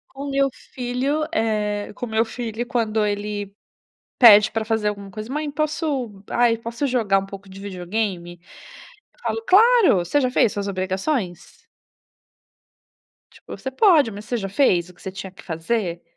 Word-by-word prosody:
O 280 +1 -5
meu 275 0 +2 0.3
filho, 260 +4 -1
eh, 210 -5 -1
com 245 - -4
o - - -9
meu 220 0 +2
filho, 235 0 -5
quando 220 -3 0
ele 205 -1 -3 0.7
pede 210 -4 +8
pra 225 - -1
fazer 220 -1 0
alguma 200 -1 -4
coisa: 215 +5 -7
"Mãe, 300 0 -2
posso 285 - -2
ai, 240 -1 +3
posso 230 +5 -3
jogar 220 -7 +2
um 195 - -6
pouco 195 0 -11
de 190 +1 -11
videogame?", 185 -2 -4 0.7
eu - - -30
falo: 450 - -3
"Claro, 450 - +6
você 175 +11 +1
já 255 -2 0
fez 230 - +3
suas 200 0 -3
obrigações?". 190 - -3 1.6
Tipo, - - -11
"Você 265 - -5
pode, 310 - +4
mas 205 0 -9
você 245 - -1
já 195 -4 -3
fez 185 -6 +2
o 180 - -15
que 175 - -20
você 190 - -6
tinha 190 0 -7
que 190 - -15
fazer?". 170 +1 -2
220 Hz, 165 wpm, -22 LUFS, 195-255 Hz, 1.6 s, pede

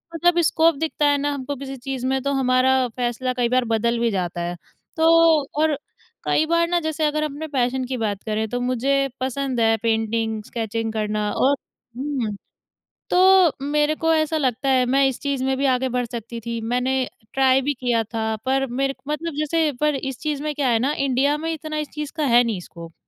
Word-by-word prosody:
मतलब 345 +1 +3
स्कोप 325 0 +3
दिखता 305 0 -1
है 285 0 +3
ना 290 +1 -1
हमको 280 0 -4
किसी 270 0 -7
चीज़ 260 0 -5
में 265 0 0
तो 280 - 0
हमारा 260 -1 +3
फ़ैसला 250 +1 -1
कई 240 -1 +1
बार 255 0 +2
बदल 235 +1 +1
भी 235 -1 +1
जाता 175 -3 -2
है। 175 +1 -3 0.4
तो 320 +1 +4 0.5
और 310 -3 +2 0.5
कई 315 - +2
बार 335 +1 +2
ना 350 0 +1
जैसे 315 -1 -1
अगर 305 0 0
अपने 305 +1 -4
पैशन 260 -2 0
की 255 0 -3
बात 205 -4 -2
करें, 220 0 -1
तो 245 - -2
मुझे 265 +3 +1
पसंद 260 -1 -2
है 225 0 +4
पेंटिंग, 220 -1 0
स्केचिंग 225 0 -3
करना। 210 -1 -1
और 275 +2 +2 0.4
हुँ, 260 -6 -2 0.7
तो 370 -2 +5
मेरे 295 +1 +1
को 325 +1 +1
ऐसा 315 0 +1
लगता 260 -2 0
है 255 -1 +4
मैं 270 +2 +3
इस 265 - -3
चीज़ 280 -2 -1
में 265 0 +1
भी 275 - 0
आगे 260 0 +1
बढ़ 250 0 -1
सकती 235 0 -7
थी। 235 0 -3
मैंने 250 +3 0 0.3
ट्राई 265 0 +4
भी 285 +2 0
किया 240 -3 0
था 220 0 -3
पर 270 +1 +1
मेर 270 +2 -1
मतलब 305 +2 -3
जैसे 305 +1 +1
पर 300 -1 +2
इस 270 -1 -4
चीज़ 300 -2 -2
में 305 0 -2
क्या 280 -2 0
है 230 -2 +3
ना 270 +5 +1
इंडिया 275 +2 +1
में 325 +2 -3
इतना 310 -1 -5
इस 300 -1 -3
चीज़ 300 -1 -5
का 310 - 0
है 240 -2 +5
नहीं 225 -6 -2
स्कोप। 170 -1 -11
265 Hz, 205 wpm, -22 LUFS, 235-295 Hz, 0.7 s, तो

